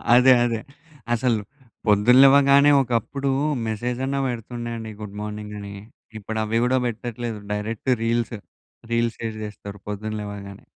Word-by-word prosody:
అదే 130 +1 +7
అదే. 115 -2 -1 0.5
అసలు 120 -1 +1 0.5
పొద్దున 105 +4 +5
లెవ్వగానే 140 +1 +6
ఒకప్పుడు 130 +3 -1 0.4
మెసేజ్ 120 +3 -2
అన్న 140 +1 -1
పెడుతుండే 120 0 -5
అండి 110 -1 -7
గుడ్ 105 -1 -8
మార్నింగ్ 105 0 -6
అని. 100 0 -8 0.5
ఇప్పుడు 110 +1 -4
అవి 110 +1 0
గూడా 130 +1 +2
పెట్టట్లేదు. 120 -1 -5
Direct 105 +4 -3
reels. 115 0 0 0.6
రీల్స్ 115 0 0
షేర్ 110 -1 -4
చేస్తరు 100 -1 -9
పొద్దున్న 105 +1 -4
లేవంగానే. 100 -1 -8
115 Hz, 135 wpm, -23 LUFS, 105-125 Hz, 0.6 s, అదే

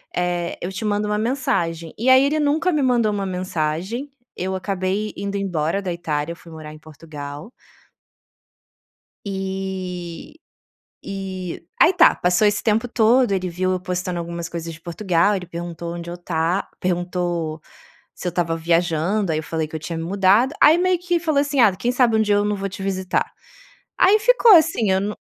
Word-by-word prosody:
Eh, 175 -1 -1
eu 180 - -4
te 215 +3 -5
mando 210 0 0
uma 210 0 0
mensagem". 215 - -1
E 245 +4 +1
aí 260 +1 +7
ele 300 +2 +1
nunca 305 +5 +1
me 300 -3 +1
mandou 240 -4 +2
uma 200 -1 -2
mensagem, 185 - -3 0.3
eu 190 +1 -3
acabei 195 +2 -2
indo 200 0 -4
embora 180 -1 -1
da 185 - -3
Itália, 165 -2 -3
eu - - -12
fui 170 -1 -15
morar 155 -1 -9
em 155 - -13
Portugal. 150 - -9 1.7
E 190 - -5 0.7
e 190 -3 -6
aí 345 - +7
tá. - - +6
Passou 180 +4 +2
esse 205 0 +1
tempo 225 +2 +1
todo. 235 0 +3
Ele 185 -1 -1
viu 185 +2 -1
eu 185 - -1
postando 180 -1 -3
algumas 170 0 -5
coisas 165 -1 -6
de 165 - -12
Portugal. 180 +2 +1
Ele 180 -2 -4
perguntou 170 0 -6
onde 170 0 -7
eu 175 - -6
ta 175 +1 -1
perguntou 175 -3 -2 0.6
se 180 - -4
eu - - -1
estava 165 -1 -1
viajando, 170 +3 +1
aí 155 - 0
eu - - -3
falei 160 0 -3
que 160 - -13
eu 160 - -3
tinha 165 +1 -5
me 165 - -4
mudado. 200 - +3
Aí, 310 +3 +7
meio 365 0 +2
que 350 -1 0
falou 310 -4 +1
assim: 285 -2 0
"Ah, 210 -5 +5
quem 240 +6 -1
sabe 240 -3 +3
dia 205 -1 +2
eu 205 - +2
não 210 0 0
vou 195 0 -3
te 195 +1 -8
visitar?" 190 -1 -1 0.7
Aí 405 +3 +6
ficou 475 0 +5
assim, 315 - +2
eu 190 - +2
não 205 +2 -3
185 Hz, 185 wpm, -21 LUFS, 170-215 Hz, 1.7 s, aí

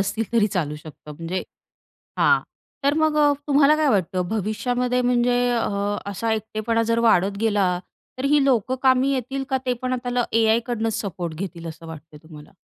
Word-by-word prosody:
असतील 210 +3 -1
तरी 225 -3 +4
चालू 165 -7 -2
शकतं. 150 0 -12
म्हणजे 165 +4 -4 0.8
हां. - - +4 0.4
तर 285 +1 +3
मग 315 -1 +2 0.3
तुम्हाला 290 +1 +4
काय 310 -1 +2
वाटतं 185 -5 0
भविष्यामध्ये 245 +4 -1
म्हणजे 245 0 +2 0.2
अ, - - -1 0.4
असा 225 +4 -2
एकटेपणा 220 +1 -1
जर 230 0 +1
वाढत 200 -1 +2
गेला 205 -4 +2 0.5
तर 260 - -4
ही 295 -2 +4
लोक 255 -3 +2
कामी 260 +1 +4
येतील 270 +1 -3
का? 265 - +2
ते 250 - +2
पण 255 0 -1
आता 245 0 -1
एआयकडूनच 225 0 +1
सपोर्ट 175 -5 -5
घेतील 170 -1 -6
असं 165 +1 -10
वाटतंय 155 -1 -11
तुम्हाला? 155 -2 -14
225 Hz, 160 wpm, -23 LUFS, 185-250 Hz, 0.8 s, तरी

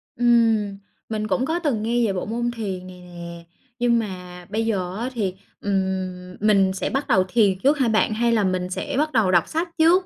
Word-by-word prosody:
Ừm, 225 -4 +3 0.3
mình 215 -1 -2
cũng 245 +6 +1
có 325 +4 0
từng 275 -11 -1
nghe 235 +1 +1
về 200 - 0
bộ 185 - -3
môn 240 +2 -1
thiền 195 -6 -5
này 180 -1 -11
nè. 170 -1 -9 0.4
Nhưng 240 -1 +3
mà 180 -4 -7
bây 220 +2 -1
giờ 190 -5 -1
á 240 +3 -2
thì, 200 -6 -2 0.3
ừm, 185 -2 -2
mình 195 -3 +3
sẽ 190 - -2
bắt 270 +2 -2
đầu 185 - +4
thiền 195 -2 +2
trước 280 +7 +3
hả 260 - +3
bạn? 220 0 +2
Hay 235 +2 +1
là 225 -3 +3
mình 185 -1 -1
sẽ 280 +9 -3
bắt 305 +2 +1
đầu 220 -8 +3
đọc 175 -2 +3
sách 330 +3 -1
trước? 345 +3 +5
215 Hz, 215 wpm, -23 LUFS, 185-240 Hz, 0.4 s, trước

